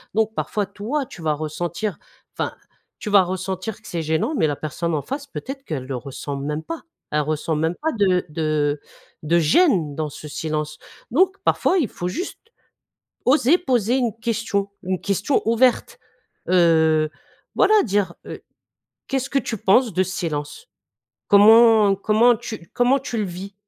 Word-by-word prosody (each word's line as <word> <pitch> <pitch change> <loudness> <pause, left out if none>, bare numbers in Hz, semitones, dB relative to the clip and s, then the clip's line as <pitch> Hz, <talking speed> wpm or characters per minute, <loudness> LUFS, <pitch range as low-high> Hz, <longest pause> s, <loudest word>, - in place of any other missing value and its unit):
Donc, 220 0 +1
parfois, 210 -2 -1
toi, 220 +9 -3
tu 180 - -12
vas 155 -1 +1
ressentir, 165 +5 -3 0.4
enfin, - - -3 0.4
tu 210 - -5
vas 200 -2 +6
ressentir 190 +3 -4
que - - -14
c'est 170 - -3
gênant 160 - 0
mais - - +3
la 145 -2 -2
personne 165 +3 -3
en 150 - -1
face, 275 - -5
peut-être 270 0 -7
qu'elle 145 - -5
le 130 0 -4
ressent 140 +2 -6
même 150 +3 -3
pas, 330 -1 -6 0.3
elle 150 - +2
ressent 155 +2 -2
même 160 +3 0
pas 320 +1 0
de 185 -5 +2
de 150 -2 -1 0.4
de 170 +3 +3
gêne 165 - +3
dans 155 0 -2
ce 150 - -10
silence. 150 0 -3 0.3
Donc 375 +8 +3
parfois, 380 - +2
il 285 - +1
faut 175 - -5
juste 355 - -5 0.9
oser 285 +4 +4
poser 245 - +1
une 235 -4 -1
question, 215 -3 -1
une 185 -1 -2
question 200 +7 0
ouverte, 235 +2 +2 0.5
heu, 160 -3 +4 0.5
voilà, 405 +1 +4
dire: 200 -4 0
«Heu, - - -8 0.7
qu'est-ce 270 0 -2
que 275 - +2
tu 235 -3 -3
penses 220 +5 +3
de 185 - +3
ce 185 - -4
silence? 160 - -4 0.6
Comment 220 0 +7
comment 220 +4 +4
tu 220 -7 -8
comment 250 +2 +3
tu 245 -3 -5
le 215 - 0
vis?» 190 +2 -7
195 Hz, 165 wpm, -22 LUFS, 160-235 Hz, 0.9 s, Comment